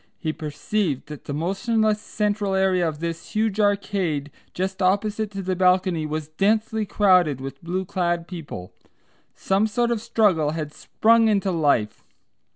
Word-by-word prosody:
He 155 -2 -3
perceived 155 0 -2
that 150 -2 -9
the - - -5
motionless 210 +6 0
central 205 -2 -1
area 185 -3 +2
of 150 0 -8
this 165 +2 -5
huge 215 -1 0
arcade 195 -8 0 0.2
just 190 +2 -3
opposite 205 +3 +1
to 195 -1 -6
the 185 0 -1
balcony 180 -3 +2
was 155 0 -4
densely 215 +5 0
crowded 180 - +3
with 135 +2 -8
blue 185 +3 -2
clad 175 -2 -1
people. 150 - -8 0.6
Some 195 +3 +1
sort 240 +2 0
of 230 -3 -1
struggle 175 -11 +2
had 150 -2 -4
sprung 225 +6 +3
into 200 -3 +1
life. 145 -10 +1
185 Hz, 150 wpm, -23 LUFS, 160-210 Hz, 0.6 s, crowded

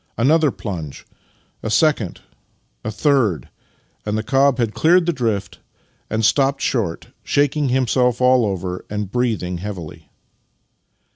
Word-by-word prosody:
Another 150 +5 +4
plunge 85 - -6 0.3
— - - -40
a 110 - -3
second 115 - +1 0.3
— - - -44
a - - -3
third 110 - +1 0.3
— - - -41
and 105 0 -2
the 110 - -2
cob 135 +1 +3
had 115 -4 0
cleared 175 +2 +4
the 170 - +1
drift 110 -7 -2 0.5
and 110 0 0
stopped 140 +4 +2
short, 105 -10 -2
shaking 145 0 +1
him 130 +1 +2
self 125 0 +1
all 125 -1 +4
over 95 -3 -3
and 105 -2 -4
breathing 110 -8 -1
heavily. 90 -5 -8
115 Hz, 145 wpm, -20 LUFS, 100-135 Hz, 0.5 s, Another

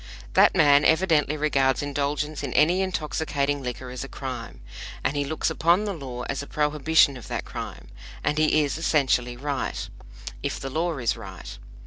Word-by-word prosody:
That - - +5
man 145 -4 +6
evidently 160 -3 +3
regards 135 -3 +2
indulgence 145 +1 -2
in - - -4
any 175 +5 +4
intoxicating 150 -5 -1
liquor 125 0 -5
as 125 0 -5
a - - -7
crime, 130 -5 -7 0.4
and 135 - 0
he 145 - +1
looks 155 +2 -1
upon 170 +6 +3
the 205 - -2
law 130 -7 -6
as 135 +2 -3
a 140 - -8
prohibition 150 -1 +3
of 125 - -11
that - - -4
crime. - - -7 0.4
And 150 - 0
he 155 0 +4
is 145 +2 -2
essentially 125 -6 +1
right, 140 0 -3 0.5
if - - -3
the 135 - -5
law 165 +2 -1
is 120 -3 0
right. 95 -5 -9
145 Hz, 170 wpm, -25 LUFS, 135-155 Hz, 0.5 s, man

